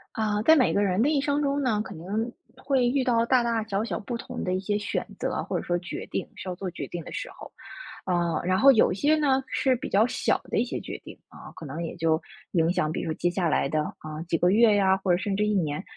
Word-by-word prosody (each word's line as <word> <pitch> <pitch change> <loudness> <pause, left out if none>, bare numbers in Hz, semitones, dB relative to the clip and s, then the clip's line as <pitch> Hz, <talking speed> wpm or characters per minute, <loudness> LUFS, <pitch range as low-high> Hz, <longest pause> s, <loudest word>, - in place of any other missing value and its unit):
呃， 210 -1 0
在 320 +5 +7
每 260 -5 +3
个 200 - +2
人 195 0 +1
的 275 - +3
一 300 -2 +2
生 285 +1 0
中 280 0 0
呢， 225 -6 +1
可 200 - -7
能 205 +8 -3 0.2
会 260 -1 +1
遇 260 +2 +1
到 235 -2 +2
大 250 0 +3
大 230 -1 0
小 200 -1 -1
小 230 - -3
不 235 +3 -4
同 - - -6
的 180 - 0
一 185 - 0
些 205 +1 -1
选 210 - -2
择， - - -2
或 - - -2
者 - - -7
说 175 - +1
决 175 - -6
定 - - -3
需 - - -8
要 180 - -3
做 185 0 -5
决 - - -6
定 175 -1 -6
的 - - -10
时 - - -5
候。 - - -12 0.5
啊， 175 -2 0
然 185 +1 +1
后 275 +5 +8
有 225 -7 +4
些 290 +11 +2
呢， 275 -3 +2
是 260 -1 +1
比 245 - -6
较 205 +3 +4
小 - - 0
的 - - -3
一 - - +3
些 - - -4
决 - - -7
定 - - -11
啊， - - -12
可 160 - -9
能 155 +4 -5
也 165 - -5
就 160 -1 +1 0.3
影 165 -1 +2
响 155 -4 0
比 - - -3
如 165 - -3
接 175 - 0
下 175 -2 0
来 140 - +1
的， 155 +2 0 0.2
啊， 155 0 -7
几 165 - +1
个 175 +2 +3
月 220 0 +5
呀， 190 -2 +4
或 190 -1 -1
者 175 - +4
甚 195 +1 -2
至 210 - +1
1 210 - +1
年。 155 -2 -1
205 Hz, 290 characters per minute, -26 LUFS, 175-245 Hz, 0.5 s, 后